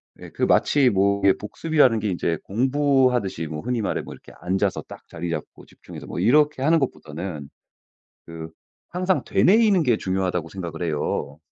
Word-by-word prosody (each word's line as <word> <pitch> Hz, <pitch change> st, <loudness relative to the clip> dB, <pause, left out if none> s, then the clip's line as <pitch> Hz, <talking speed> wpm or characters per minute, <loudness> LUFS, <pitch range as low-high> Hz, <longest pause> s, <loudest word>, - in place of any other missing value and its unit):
네 -, -, -12 dB
그 -, -, -4 dB
마치 140 Hz, -3 st, +3 dB
뭐 100 Hz, -1 st, +1 dB
이게 100 Hz, -, +6 dB
복습이라는 130 Hz, +1 st, +1 dB
게 105 Hz, 0 st, -2 dB
이제 85 Hz, -2 st, -1 dB
공부하듯이 130 Hz, -, +1 dB
뭐 75 Hz, 0 st, -6 dB
흔히 125 Hz, -1 st, -2 dB
말해 105 Hz, -, -2 dB
뭐 -, -, -10 dB
이렇게 -, -, -15 dB
앉아서 95 Hz, +2 st, -1 dB
딱 -, -, -12 dB
자리 85 Hz, +1 st, -6 dB
잡고 75 Hz, -2 st, -6 dB
집중해서 -, -, -12 dB
뭐 -, -, -6 dB
이렇게 145 Hz, +8 st, +3 dB
하는 160 Hz, +4 st, +3 dB
것보다는 80 Hz, -, -5 dB, 0.8 s
그 80 Hz, -1 st, -8 dB, 0.4 s
항상 180 Hz, +1 st, 0 dB
'되뇌이는 205 Hz, -3 st, +4 dB
게 125 Hz, -5 st, +3 dB
중요하다.'고 95 Hz, -4 st, -2 dB
생각을 85 Hz, -3 st, -6 dB
해요. 75 Hz, -2 st, -2 dB
100 Hz, 360 characters per minute, -23 LUFS, 85-135 Hz, 0.8 s, 이게